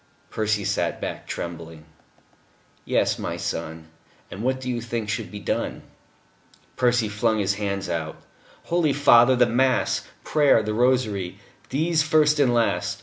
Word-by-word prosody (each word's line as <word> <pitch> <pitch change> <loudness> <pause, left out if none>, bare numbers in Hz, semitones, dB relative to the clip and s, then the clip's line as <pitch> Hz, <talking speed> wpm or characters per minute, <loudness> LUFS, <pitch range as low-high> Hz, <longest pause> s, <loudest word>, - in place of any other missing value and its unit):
Percy 105 -2 -1
sat - - -1
back, - - -6
trembling. 80 -2 -7 1.0
"Yes, - - +1
my - - -4
son. 80 0 -5 0.4
And 95 - -7
what 130 +2 0
do 130 - -8
you 120 -2 -2
think 115 -2 -4
should 110 -3 -3
be 105 - -8
done?" - - -3 0.9
Percy 125 -3 +2
flung 105 +2 0
out 105 - 0
his 100 0 +1
hands. 100 -1 -3 0.8
"Holy 170 -4 +1
Father 130 -3 +6
the 125 0 +4
mass, 130 +3 +1 0.2
prayer, 145 -7 +3
the 105 0 -2
rosary. 110 -6 0 0.3
These 160 +4 +1
first 155 0 +3
and 135 -4 +4
last. 100 -4 0
115 Hz, 145 wpm, -24 LUFS, 100-130 Hz, 1.0 s, Father